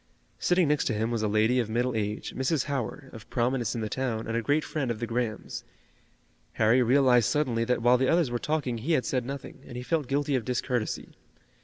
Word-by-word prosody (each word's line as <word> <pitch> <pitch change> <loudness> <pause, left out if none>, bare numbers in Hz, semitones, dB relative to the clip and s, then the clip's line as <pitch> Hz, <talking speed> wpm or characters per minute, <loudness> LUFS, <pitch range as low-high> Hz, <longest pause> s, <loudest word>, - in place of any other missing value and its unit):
Sitting 180 -2 +3
next 150 -1 +1
to 115 - 0
him 110 +2 -1
was 115 -2 -1
a 110 - +1
lady 110 +4 +3
of 115 -3 -1
middle 120 +2 0
age, 105 -1 -3
Mrs. 130 +2 +1
Howard, 135 0 -4
of 110 -2 -11
prominence 120 0 0
in 115 - -2
the 110 - -2
town 115 -1 -2
and 115 - -3
a 115 - +1
great 145 +6 +1
friend 140 -5 -2
of 115 -2 -2
the 120 - -2
Grahams. 115 -2 -3 0.9
Harry 115 +3 +4
realized 125 -2 +4
suddenly 125 -6 +1
that 125 -1 0
while 125 +1 +5
the 130 - +2
others 165 -6 +3
were 120 - -1
talking 140 -6 -1
he 150 +9 0
had 130 - +2
said 125 -2 -1
nothing, 140 0 -7
and 120 - -8
he 125 - -5
felt 155 0 -1
guilty 145 +2 0
of 130 -3 +1
discourtesy. 125 -2 -2
125 Hz, 220 wpm, -28 LUFS, 115-135 Hz, 0.9 s, while